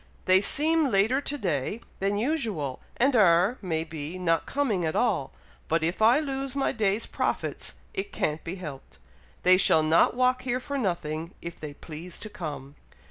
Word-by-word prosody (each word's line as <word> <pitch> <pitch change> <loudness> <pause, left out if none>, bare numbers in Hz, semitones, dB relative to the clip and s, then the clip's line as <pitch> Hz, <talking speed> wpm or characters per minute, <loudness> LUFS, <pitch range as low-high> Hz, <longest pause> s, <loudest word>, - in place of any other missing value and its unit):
They 185 +1 +5
seem 310 +7 +3
later 220 +6 +3
to 290 +1 -3
day 175 - -2 0.2
than 200 +1 0
usual, 215 - -1 0.2
and 265 +2 +3
are, 190 +2 +4
may 160 -5 -1
be, 160 +1 -6
not 165 -2 0
coming 240 -11 0
at 160 -1 -1
all; - - +1 0.4
but 165 0 +1
if 170 +6 -1
I 235 +6 +6
lose 275 -2 -3
my 275 - +1
day's 215 0 0
profits, - - -2 0.2
it 400 -1 -3
can't 150 0 -2
be 170 - -5
helped. 150 -8 -9 0.5
They 185 0 +7
shall 160 -4 +4
not 160 +8 +4
walk 255 0 +2
here 250 -1 -1
for 280 +2 -4
nothing, 170 -5 -3
if 170 0 -8
they 150 -2 -7
please 165 +4 -8
to 215 - -8
come!" 145 -7 -7
190 Hz, 175 wpm, -27 LUFS, 160-255 Hz, 0.5 s, They